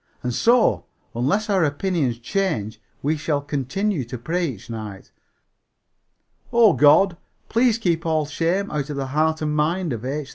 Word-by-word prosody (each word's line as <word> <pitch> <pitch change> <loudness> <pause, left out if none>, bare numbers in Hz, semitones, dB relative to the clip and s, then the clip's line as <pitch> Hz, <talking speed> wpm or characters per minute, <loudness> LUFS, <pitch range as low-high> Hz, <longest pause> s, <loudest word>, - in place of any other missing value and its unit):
And 125 -1 -2
so, 235 - +3 0.3
unless 185 - 0
our 195 -4 +2
opinions 145 -4 0
change, 115 - -2 0.2
we 150 +3 +1
shall 145 0 -1
continue 145 +5 -2
to 120 +2 -6
pray 170 +8 -1
each 115 -9 -8
night, 105 -4 -8 1.4
"Oh 230 -5 +5
God, 165 +5 +5 0.3
please 230 0 +3
keep 170 -7 0
all 155 -2 0
shame 170 +6 -1
out 150 -1 -3
of 145 - -4
the 135 -1 -2
heart 160 +1 +1
and 150 0 -1
mind 165 +1 0
of 115 -1 -6
H. 140 +2 -4
155 Hz, 155 wpm, -22 LUFS, 135-185 Hz, 1.4 s, Oh